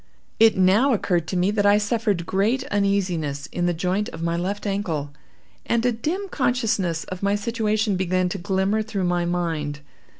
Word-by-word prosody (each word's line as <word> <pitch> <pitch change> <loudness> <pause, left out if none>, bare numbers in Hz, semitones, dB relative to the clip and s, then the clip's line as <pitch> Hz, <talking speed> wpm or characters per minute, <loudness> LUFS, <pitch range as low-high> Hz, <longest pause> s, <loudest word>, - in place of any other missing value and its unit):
It 225 -2 +6
now 200 +9 +4
occurred 175 -6 0
to 185 - -2
me 180 +3 +2
that 210 -1 +1
I 205 0 +6
suffered 210 -4 0
great 215 +9 +1
uneasiness 180 -8 0
in 175 0 -1
the 175 - +1
joint 185 +5 -1
of 165 - -7
my 170 0 0
left 195 +5 -3
ankle, 170 -8 -2 0.5
and 235 0 0
a 245 - +4
dim 320 - -3
consciousness 225 - 0
of 185 -1 -7
my 200 0 +2
situation 215 -1 0
began 185 0 +1
to 195 - -4
glimmer 190 +3 0
through 215 -3 -3
my 175 -1 +1
mind. 165 -4 -2
195 Hz, 175 wpm, -23 LUFS, 175-215 Hz, 0.5 s, It